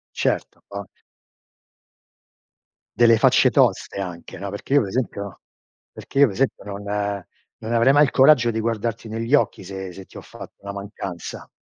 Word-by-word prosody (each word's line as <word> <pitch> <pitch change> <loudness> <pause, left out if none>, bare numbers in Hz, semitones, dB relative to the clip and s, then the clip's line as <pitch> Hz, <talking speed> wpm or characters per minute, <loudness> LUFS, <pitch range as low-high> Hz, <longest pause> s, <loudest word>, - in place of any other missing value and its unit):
Certo, - - -2
o 100 -1 -6 2.1
Delle 115 -1 +6
facce - - +5
toste - - +1
anche, 90 -2 -7
no, 100 +2 -5
perché 105 +7 -4
io 145 - +6
per 100 - -4
esempio 100 -4 -4 0.5
perché 135 - -3
io 140 - +8
per 110 - -4
esempio 130 +3 -1
non 100 0 -7 0.8
non 110 - -5
avrei 120 +3 +4
mai 145 +1 +6
il 140 - -2
coraggio 130 -4 +5
di 110 - -2
guardarti 115 0 -3
negli 115 +4 -2
occhi 140 - +2
se 95 0 -7
se 95 +2 -10
ti - - -18
ho - - -6
fatto - - -12
una 100 0 -7
mancanza. 100 -3 -7
110 Hz, 165 wpm, -22 LUFS, 100-120 Hz, 2.1 s, io